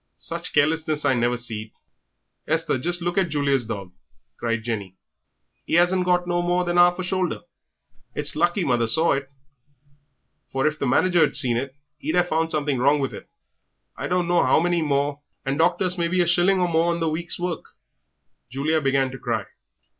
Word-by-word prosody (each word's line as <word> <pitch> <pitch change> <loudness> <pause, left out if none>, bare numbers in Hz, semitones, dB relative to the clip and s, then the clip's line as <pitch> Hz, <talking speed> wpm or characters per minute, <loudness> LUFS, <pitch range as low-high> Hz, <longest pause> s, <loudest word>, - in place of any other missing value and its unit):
Sich - - -3
carelessness 155 0 +1
I 140 - +4
never 120 0 +1
seed." 110 -3 -6 0.7
"Esther, - - +1
just 175 +5 -2
look 175 +2 0
at 185 -3 0
Julia's 140 -5 0
dog," 100 -4 -6 0.5
cried 115 -1 -2
Jenny, 100 -5 -4 0.7
"'e - - +3
'asn't 180 +1 +3
got 180 0 +2
no 175 0 0
more 175 +1 +1
than 175 0 +1
'arf 175 0 +5
a 185 - -3
shoulder. 185 -1 -1 0.7
It's 150 0 0
lucky 175 +4 +1
mother 120 -5 +1
saw 160 +8 +3
it, 135 -1 -2 1.2
for 135 +1 -1
if 155 0 0
the 140 - -1
manager'd 175 +5 +3
seen 125 -5 +3
it 130 +3 -3 0.2
he'd 155 +4 -2
have 175 0 +2
found 160 +1 0
something 145 -4 -1
wrong 140 +4 +3
with 135 - -2 0.8
I - - -4
don't 180 -1 0
know 175 0 +3
'ow - - +4
many 175 0 +1
more, 145 -1 0 0.2
and 135 +2 -2
docked 175 +3 +2
us 180 0 -1
maybe 170 +2 0
a - - +2
shilling 175 +3 +3
or 180 - +2
more 165 0 +2
on 170 - -2
the 165 - 0
week's 160 +2 -2
work." 175 -2 -3 0.9
Julia 150 +5 0
began 135 -1 +1
to 135 - -9
cry. - - -2
155 Hz, 185 wpm, -23 LUFS, 135-175 Hz, 1.2 s, arf